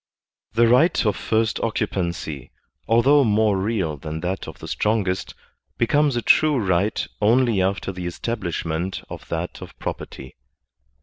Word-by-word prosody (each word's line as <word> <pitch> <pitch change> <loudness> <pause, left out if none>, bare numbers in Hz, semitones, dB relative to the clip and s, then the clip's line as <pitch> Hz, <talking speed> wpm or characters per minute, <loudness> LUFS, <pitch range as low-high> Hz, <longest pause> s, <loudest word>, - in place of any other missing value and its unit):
The 115 +1 +4
right 125 +5 +4
of 105 - +2
first 110 0 0
occupancy, 85 - -3 0.4
although 135 +6 +5
more 105 -3 +2
real 95 -7 -1
than 80 +3 -6
that 95 +3 -3
of - - -9
the - - -9
strongest, 105 -4 -1 0.4
becomes 145 +3 +2
a 120 - -1
true 155 -2 +4
right 100 -1 +1 0.2
only 115 -1 +3
after 95 +1 -1
the 90 -2 -5
estab 115 +7 -3
lishment 85 -1 -3
of - - -9
that 85 +2 -4
of - - -11
property. 65 -1 -6
105 Hz, 140 wpm, -23 LUFS, 90-115 Hz, 0.4 s, although